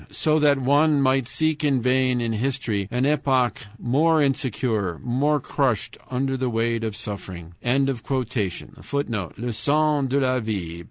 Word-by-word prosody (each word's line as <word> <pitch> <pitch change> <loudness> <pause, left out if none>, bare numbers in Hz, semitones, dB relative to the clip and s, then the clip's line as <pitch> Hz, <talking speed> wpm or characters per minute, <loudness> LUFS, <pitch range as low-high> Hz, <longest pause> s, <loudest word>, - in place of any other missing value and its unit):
So 155 -1 +1
that 145 -2 +4
one 145 +3 +3
might 135 -2 +2
seek 155 +2 0
in 140 -3 +2
vain 125 0 +2
in 115 -1 -1
history 110 -4 -1
an 125 +3 0
epoch 135 -6 +1
more 155 +8 +2
insecure, 120 - 0
more 145 +5 +1
crushed 130 -5 -1
under 135 +1 -1
the 130 -1 -1
weight 115 0 0
of 110 -2 -3
suffering" 90 -5 -7
[footnote: 125 - -2
"Le 120 +1 -3
Sens 145 +2 +1
de 140 +2 +2
la 130 -1 +1
Vie," 110 -2 -2
pp. 85 -4 -5
130 Hz, 150 wpm, -23 LUFS, 115-140 Hz, -, that